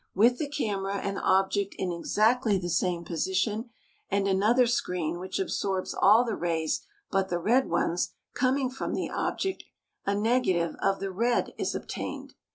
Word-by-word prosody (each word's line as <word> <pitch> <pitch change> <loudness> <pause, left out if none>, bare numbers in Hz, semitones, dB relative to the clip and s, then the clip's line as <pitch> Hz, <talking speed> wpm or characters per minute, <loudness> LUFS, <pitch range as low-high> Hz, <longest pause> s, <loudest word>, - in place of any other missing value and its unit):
With 235 +5 +4
the 295 - -2
camera 200 -9 -2
and 200 0 -2
object 195 +1 +1
in 185 -2 -1
exactly 215 +5 +2
the 175 -1 -3
same 170 0 0
position 190 - -1 0.4
and 200 0 +1
another 215 +6 +4
screen 180 -8 -1
which 185 +1 -4
absorbs 195 - -1
all 220 +5 +5
the 225 - -1
rays 165 -2 -1 0.3
but 195 -1 +1
the 175 - 0
red 240 +10 +2
ones 175 +1 +1 0.2
coming 260 0 +1
from 265 - -3
the - - -3
object, 385 -1 -2 0.4
a 200 - 0
negative 205 -7 +1
of 195 0 +1
the 195 -1 -2
red 235 +6 0
is - - -1
obtained. - - -5
195 Hz, 160 wpm, -28 LUFS, 185-240 Hz, 0.4 s, all